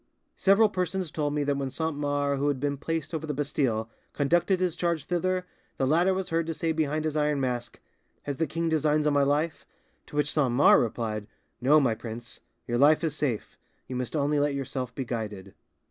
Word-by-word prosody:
Several 200 +3 +5
persons 185 -3 -2
told 145 -2 -1
me 150 - +1
that 140 -1 0
when 135 -1 -2
Saint 160 +3 -2
Mars, 145 -1 0
who 145 - +1
had 145 -3 0
been 145 +1 -1
placed 165 +3 -3
over 160 -1 -3
the 150 - -2
Bastille, 135 -6 0 0.3
conducted 175 +6 +2
his 180 -3 0
charge 170 -4 -1
thither, 185 +2 0 0.3
the 135 - +1
latter 170 +7 +3
was 190 0 -2
heard 165 0 0
to 165 - -2
say 165 +1 -1
behind 155 -1 -1
his 155 -1 -1
iron 150 -1 +1
mask, 125 -2 -3 0.4
'Has 145 -2 -4
the 160 - 0
king 165 +3 -2
designs 155 -1 +2
on 150 - +3
my 145 - +4
life?' 145 +3 0 0.4
To - - -11
which 150 0 +1
Saint 135 -6 +2
Mars 135 +4 +6
replied, 110 -2 -3 0.3
'No, 145 +5 +6
my 130 -6 +2
prince; 115 +1 -7 0.3
your 120 0 -1
life 150 +4 +5
is 155 -3 -1
safe: 130 -8 -2 0.3
you 130 - -6
must 125 +4 -3
only 145 0 +1
let 145 -1 +1
yourself 130 -2 -3
be 135 - -3
guided. 105 -5 -5
145 Hz, 210 wpm, -27 LUFS, 130-160 Hz, 0.4 s, Mars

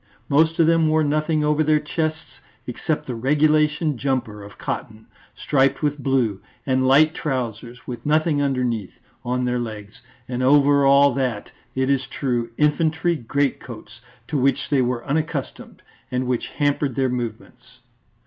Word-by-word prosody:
Most 160 +3 +3
of 165 - +4
them 165 0 +3
wore 155 0 +2
nothing 155 +1 0
over 150 +1 +2
their 155 0 +3
chests 155 +1 -4 0.3
except 150 +5 -3
the 130 - -4
regulation 150 +3 +1
jumper 125 -6 -2
of 100 0 -12
cotton, 110 0 -6 0.3
striped 135 +1 +1
with 145 0 0
blue, 125 -7 0 0.2
and 130 -1 +1
light 155 +4 +5
trousers, 125 -3 -4
with 120 -2 -7
nothing 155 0 +1
underneath, 125 -7 -2 0.3
on 125 0 -1
their 125 0 0
legs, 105 -3 -7 0.3
and 125 0 -3
over 140 +1 +4
all 140 0 +5
that, 125 -5 -2 0.2
it 130 0 0
is 135 -1 0
true, 120 -4 -2
infantry 160 +3 +1
great 140 +1 -1
coats 120 0 -11 0.3
to 150 - -1
which 135 +2 +1
they 140 -2 +3
were 120 -1 -2
unaccustomed 150 -1 -4 0.3
and 125 0 -2
which 125 -1 -1
hampered 145 -3 -1
their 135 -1 +1
movements. 120 -3 -7
135 Hz, 150 wpm, -22 LUFS, 125-150 Hz, 0.3 s, light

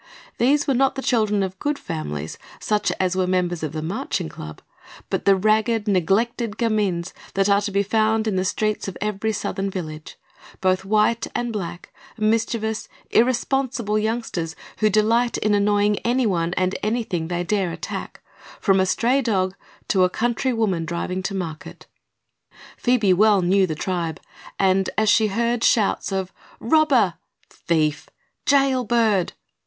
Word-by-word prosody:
These 285 +5 +3
were 275 - +1
not 270 +1 +2
the 265 - -4
children 215 -4 +2
of 190 0 -5
good 295 0 -1
families, 80 - -5 0.2
such 210 -1 0
as 185 -1 +1
were 185 -1 +1
members 180 -2 0
of 155 -2 -3
the 155 0 -4
Marching 175 -1 -3
Club, 75 0 -9 0.5
but - - -1
the 195 - +6
ragged, 215 +2 +1
neglected 210 +4 +1
gamins 205 -7 0 0.2
that 195 0 +2
are 200 0 +4
to 205 - -2
be 200 0 +1
found 220 +1 +1
on 210 - 0
the 185 - +1
streets 215 +2 -1
of 195 - -6
every 210 +1 -1
Southern 195 -1 -3
village; 155 -5 -7 0.4
both 185 0 +1
white 215 +3 +2
and 240 -1 -2
black; 175 -4 -6 0.2
mischievous, 220 0 0 0.2
irresponsible 245 -2 +1
youngsters 215 -7 -2 0.2
who 215 - +3
delight 225 +4 +2
in 215 0 +1
annoying 205 0 +2
anyone 200 -9 0
and 185 0 0
anything 210 -7 -1
they 175 0 -2
dare 190 -1 0
attack, - - -6 0.4
from 195 -2 +3
a 190 - +2
stray 245 +8 +2
dog 190 -6 0 0.3
to 190 -2 +3
a 180 - +4
country 240 +5 0
woman 210 -8 0
driving 170 +3 -3
to 195 +1 -3
market. 165 -5 -6 0.9
Phoebe 230 -6 +2
well 205 0 +4
knew 190 +2 +3
the 160 - -3
tribe 170 -1 -3 0.4
and, 190 0 +2
as 220 -1 +3
she 220 +1 +4
heard 235 +3 0
shouts 210 -2 +2
of 190 -1 -3 0.3
"Robber!" 255 - +3 0.4
"Thief!" 155 -3 -1 0.4
"Jailbird!" 240 -8 +2
205 Hz, 150 wpm, -22 LUFS, 185-225 Hz, 0.9 s, the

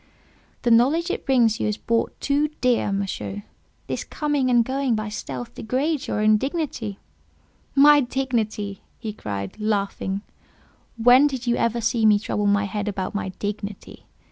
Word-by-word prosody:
"The 240 - +2
knowledge 295 +10 +4
it - - -5
brings 235 -5 +3
you - - 0
is 210 0 -1
bought 230 0 -1
too 290 +1 +1
dear, 245 -5 +2
Monsieur; 200 +1 -3 0.4
this - - -3
coming 290 -4 -1
and 240 -2 +4
going 265 -2 0
by 215 -1 -3
stealth 130 - -6
degrades 275 +6 -1
your 210 - -1
own 215 0 +5
dignity." 265 - -3 0.8
"My 290 +1 +7
dignity!" 230 -6 -2 0.2
he 220 -3 -5
cried, 100 - -5
laughing; 200 -2 -1 0.7
"when 245 +5 +6
did 260 -3 -4
you 240 0 +2
ever 235 0 0
see 225 -1 +2
me 210 -1 +6
trouble 205 0 -1
my 205 0 +3
head 205 +1 -3
about 190 -2 -3
my 205 -2 -2
dignity? 205 +1 -6
225 Hz, 155 wpm, -23 LUFS, 205-260 Hz, 0.8 s, My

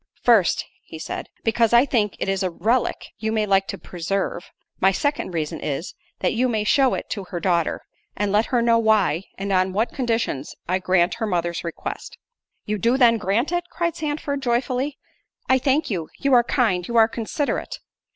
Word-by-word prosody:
"First," 220 -8 +4 0.3
said 160 - -5
he, - - -39
"because 230 0 +2
I 240 +3 +7
think 215 -7 0
it - - -3
is 195 0 0
a 185 - +1
relick 225 +8 0
you 220 +1 -1
may 215 -1 +1
like 195 -1 +2
to - - -4
preserve—my 185 +1 -2
second 285 0 -1
reason 155 -2 -2
is, 150 +4 -4 0.3
that - - +1
you 250 +3 +1
may 215 -3 0
shew 265 +4 +3
it - - -5
to 200 -3 -3
her 175 -1 -5
daughter, 170 -2 0 0.3
and 205 0 0
let 210 +3 +2
her 240 -2 +1
know 230 -1 +4
why, 215 -5 +2
and 195 +1 -3
on 185 0 +2
what 220 +5 0
conditions, 230 - -2
I 185 +2 +1
grant 180 -1 +2
her 220 - -1
mother's 175 -3 -1
request." 170 -1 -6 0.5
"You 210 0 -2
do 235 +7 +2
then 235 -3 +5
grant 210 - 0
it?" 350 0 -1
cried 340 -2 -2
Sandford 295 -3 -3
joyfully; 255 +3 -1 0.5
"I 260 0 +4
thank 275 +1 +1
you—you 190 - -2
are 240 -1 +6
kind—you 230 -4 0
are 225 -1 +7
considerate." 235 +5 -3
220 Hz, 180 wpm, -23 LUFS, 185-245 Hz, 0.5 s, I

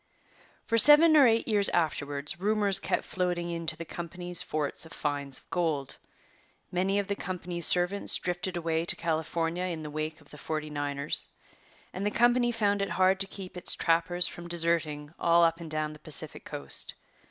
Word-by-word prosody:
For 230 - +2
seven 310 +5 +8
or 285 -4 +7
eight 225 0 +1
years 205 -2 +3
afterwards 145 -2 -2
rumours 205 -1 +2
kept - - -1
floating 175 -2 -2
in 165 -1 -5
to 160 - 0
the 170 - -7
company's 175 +1 0
forts 150 -2 -2
of 160 - -11
finds 140 -2 -2
of - - -15
gold. 160 -6 -2 0.7
Many 190 +2 0
of 200 - 0
the 200 +1 -3
company's 180 -2 -2
servants 180 +3 +2
drifted 180 0 -3
away 165 -1 -1
to 170 - +4
California 165 +2 -2
in 165 -3 -4
the 150 - -7
wake 155 +1 -4
of 150 - -21
the 150 - -11
'Forty 155 0 -4
Niners,' 145 0 0 0.7
and 190 - -5
the 205 - +1
company 240 +2 +2
found 205 -3 0
it 200 - -2
hard 190 0 +2
to 195 - +2
keep 190 -2 -9
its 180 - -3
trappers 170 +1 +4
from 175 0 -9
deserting 165 -3 -2
all 170 0 +4
up 165 0 +2
and 165 -2 -8
down 155 0 -2
the 150 - -14
Pacific 155 -1 -3
Coast. 70 -1 -4
170 Hz, 185 wpm, -28 LUFS, 155-190 Hz, 0.7 s, seven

